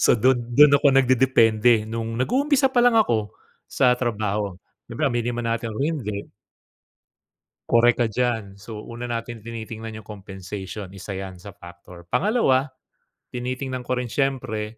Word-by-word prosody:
So, -, -, +5 dB
dun 125 Hz, +2 st, +3 dB, 0.2 s
dun 150 Hz, -1 st, +8 dB
ako 140 Hz, 0 st, +5 dB
nagdedepende 120 Hz, -4 st, +4 dB
nung 115 Hz, +1 st, -4 dB
nag-uumpisa 270 Hz, -, +2 dB
pa 245 Hz, -, +4 dB
lang 240 Hz, -1 st, +4 dB
ako 115 Hz, -, +1 dB, 0.3 s
sa 125 Hz, -1 st, +3 dB
trabaho. 105 Hz, -5 st, -2 dB, 0.3 s
Siyempre 120 Hz, +6 st, -3 dB
aminin 120 Hz, -3 st, -1 dB
man 115 Hz, -1 st, -1 dB
natin 115 Hz, 0 st, -3 dB
o 110 Hz, -, -7 dB
hindi 115 Hz, -11 st, -4 dB, 1.4 s
Korek 120 Hz, 0 st, +4 dB
ka -, -, +2 dB
diyan. 110 Hz, -4 st, -2 dB
So, 105 Hz, +1 st, -9 dB
una 120 Hz, +2 st, -7 dB
natin 115 Hz, 0 st, -4 dB
tinitingnan 110 Hz, 0 st, -7 dB
yung -, -, -30 dB
compensation, 95 Hz, -1 st, -8 dB
isa 100 Hz, +1 st, -7 dB
yan 95 Hz, -1 st, -7 dB
sa 100 Hz, +2 st, -11 dB
factor. 85 Hz, -2 st, -13 dB
Pangalawa, 135 Hz, -, +2 dB, 0.6 s
tinitingnan 130 Hz, +1 st, -4 dB
ko 125 Hz, +1 st, -2 dB
rin 125 Hz, -, -2 dB
siyempre 120 Hz, -6 st, -2 dB
115 Hz, 145 wpm, -23 LUFS, 105-130 Hz, 1.4 s, dun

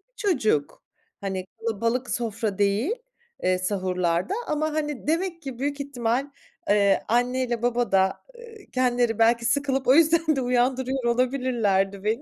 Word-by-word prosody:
çocuk. 255 Hz, -, 0 dB, 0.4 s
Hani, 190 Hz, -2 st, -3 dB
kalabalık 230 Hz, +3 st, -1 dB
sofra 220 Hz, -3 st, -2 dB
değil, 205 Hz, -, +1 dB, 0.5 s
eee, 185 Hz, 0 st, +2 dB
sahurlarda 185 Hz, -, -1 dB
ama, 305 Hz, 0 st, -1 dB
hani, 295 Hz, -3 st, -3 dB
demek 335 Hz, +2 st, -1 dB
ki 265 Hz, -5 st, -7 dB
büyük 285 Hz, +1 st, -2 dB
ihtimal, 265 Hz, 0 st, -2 dB, 0.4 s
eee, 200 Hz, -1 st, +3 dB
anneyle 245 Hz, 0 st, 0 dB
baba 245 Hz, 0 st, 0 dB
da, 190 Hz, 0 st, +2 dB
eee, 460 Hz, -4 st, -14 dB
kendileri 245 Hz, -3 st, +1 dB
belki 230 Hz, +1 st, +3 dB
sıkılıp 270 Hz, +2 st, 0 dB
o 255 Hz, -, +7 dB
yüzden 325 Hz, 0 st, +4 dB
de 270 Hz, -, -1 dB
uyandırıyor 255 Hz, +1 st, 0 dB
olabilirlerdi 235 Hz, -6 st, +1 dB
beni. 220 Hz, +5 st, 0 dB
245 Hz, 135 wpm, -25 LUFS, 210-275 Hz, 0.5 s, o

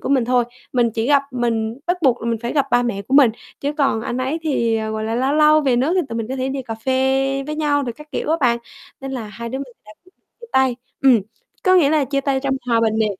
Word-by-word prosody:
của -, -, -5 dB
mình 265 Hz, -3 st, +3 dB
thôi, 245 Hz, 0 st, +2 dB, 0.3 s
mình 240 Hz, -2 st, +2 dB
chỉ 225 Hz, +1 st, -2 dB
gặp 285 Hz, -1 st, +4 dB
mình 230 Hz, -1 st, -1 dB
bắt 355 Hz, +1 st, +1 dB
buộc 255 Hz, -5 st, +2 dB
là -, -, -3 dB
mình 230 Hz, -, -1 dB
phải 235 Hz, -, -2 dB
gặp 280 Hz, -3 st, +1 dB
ba 245 Hz, -, +4 dB
mẹ 230 Hz, -5 st, -2 dB
của 260 Hz, +7 st, -3 dB
mình 275 Hz, -5 st, +7 dB, 0.3 s
chứ 285 Hz, +1 st, -1 dB
còn 275 Hz, -6 st, +1 dB
anh 240 Hz, -, -4 dB
ấy 265 Hz, +5 st, -1 dB
thì, 235 Hz, -7 st, +1 dB
ờ, 220 Hz, 0 st, -3 dB
gọi 220 Hz, 0 st, -3 dB
là, 225 Hz, +1 st, -2 dB
lâu 260 Hz, +3 st, +1 dB
lâu 305 Hz, 0 st, +5 dB
về 265 Hz, -5 st, +2 dB
nước 270 Hz, +8 st, +1 dB
thì 375 Hz, -, +3 dB
tụi 230 Hz, -, -5 dB
mình 225 Hz, 0 st, -4 dB
có 265 Hz, -, -3 dB
thể 260 Hz, 0 st, -2 dB
đi 270 Hz, 0 st, -3 dB
cà 225 Hz, -, -5 dB
phê 265 Hz, +3 st, 0 dB
với 305 Hz, -, -3 dB
nhau 290 Hz, -2 st, +1 dB
rồi 245 Hz, -3 st, -3 dB
các 300 Hz, +5 st, -15 dB
kiểu -, -, -2 dB
á 325 Hz, -, +3 dB
bạn, 240 Hz, -3 st, +3 dB, 0.4 s
nên 270 Hz, 0 st, -6 dB
là 245 Hz, -4 st, -4 dB
hai 235 Hz, +2 st, -7 dB
đứa 265 Hz, -, -4 dB
mình 275 Hz, -, -4 dB, 0.2 s
đã 215 Hz, -, -13 dB
quyết 370 Hz, -, -24 dB
định -, -, -51 dB, 0.2 s
chia 470 Hz, -, -10 dB
tay. 265 Hz, -2 st, +3 dB, 0.3 s
Ừm, 255 Hz, -5 st, +6 dB, 0.4 s
có 370 Hz, -1 st, +5 dB
nghĩa 320 Hz, -6 st, +5 dB
là 305 Hz, -2 st, +2 dB
chia 275 Hz, +1 st, -1 dB
tay 275 Hz, -1 st, 0 dB
trong 270 Hz, 0 st, 0 dB
hòa 230 Hz, -2 st, +2 dB
bình 220 Hz, -1 st, +1 dB
nè, 220 Hz, -, +3 dB
260 Hz, 290 wpm, -20 LUFS, 235-280 Hz, 0.4 s, mình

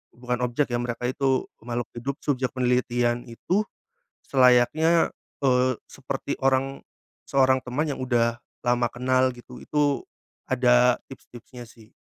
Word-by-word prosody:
bukan 125 Hz, 0 st, -3 dB
objek 125 Hz, +2 st, -1 dB
ya 120 Hz, -, 0 dB
mereka 120 Hz, 0 st, -4 dB
itu 135 Hz, -1 st, +1 dB, 0.2 s
makhluk 120 Hz, 0 st, -4 dB
hidup, 130 Hz, +4 st, -4 dB
subjek 130 Hz, -2 st, -1 dB
penelitian 125 Hz, -1 st, +1 dB
itu 185 Hz, -, -1 dB, 0.6 s
selayaknya, 135 Hz, +6 st, +4 dB, 0.3 s
eee, 130 Hz, -1 st, +3 dB, 0.2 s
seperti 140 Hz, +1 st, -5 dB
orang, 135 Hz, +1 st, 0 dB, 0.4 s
seorang 130 Hz, -1 st, +3 dB
teman 145 Hz, +5 st, -1 dB
yang 140 Hz, -, -4 dB
udah 120 Hz, -2 st, +1 dB, 0.2 s
lama 120 Hz, 0 st, +2 dB
kenal 130 Hz, +1 st, +1 dB
gitu, 120 Hz, -, -12 dB
itu 145 Hz, -2 st, 0 dB, 0.5 s
ada 125 Hz, -1 st, +4 dB
tips-tipsnya 125 Hz, -1 st, -12 dB
sih. 110 Hz, -1 st, -18 dB
125 Hz, 125 wpm, -25 LUFS, 120-135 Hz, 0.6 s, selayaknya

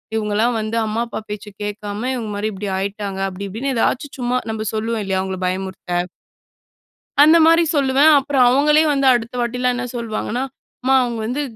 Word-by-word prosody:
இவுங்கலாம் 220 Hz, +2 st, +1 dB
வந்து 215 Hz, +2 st, -3 dB
அம்மா, 220 Hz, +2 st, -2 dB
அப்பா -, -, -5 dB
பேச்சை 210 Hz, 0 st, -7 dB
கேட்காம 205 Hz, 0 st, -5 dB
இவுங்க 225 Hz, -4 st, -4 dB
மாரி 215 Hz, +1 st, -1 dB
இப்டி 195 Hz, +1 st, -5 dB
ஆயிட்டாங்க," 195 Hz, 0 st, -4 dB
அப்டி 195 Hz, +1 st, -6 dB
இப்டின்னு 260 Hz, +7 st, -3 dB
எதாச்சும் 255 Hz, +4 st, -1 dB
சும்மா 250 Hz, 0 st, 0 dB
நம்ப 220 Hz, 0 st, -4 dB
சொல்லுவோம் 220 Hz, 0 st, -2 dB
இல்லையா, 190 Hz, -1 st, 0 dB
அவுங்கள 190 Hz, -1 st, -4 dB
பயமுறுத்த! 185 Hz, -1 st, -3 dB, 1.2 s
அந்த 315 Hz, +3 st, +7 dB
மாரி 330 Hz, +1 st, +5 dB
சொல்லுவேன். 275 Hz, +2 st, +4 dB
அப்புறம் 275 Hz, -2 st, +2 dB
அவுங்களே 295 Hz, +4 st, +4 dB
வந்து 275 Hz, -1 st, +1 dB
அடுத்த 235 Hz, 0 st, -1 dB
வாட்டில்லாம் 250 Hz, +1 st, 0 dB
என்ன 250 Hz, 0 st, -3 dB
சொல்லுவாங்கன்னா, 235 Hz, +2 st, -3 dB, 0.4 s
"அம்மா! 265 Hz, +1 st, +3 dB
அவுங்க 235 Hz, -2 st, -3 dB
வந்து 255 Hz, +6 st, -2 dB
225 Hz, 165 wpm, -20 LUFS, 205-255 Hz, 1.2 s, அந்த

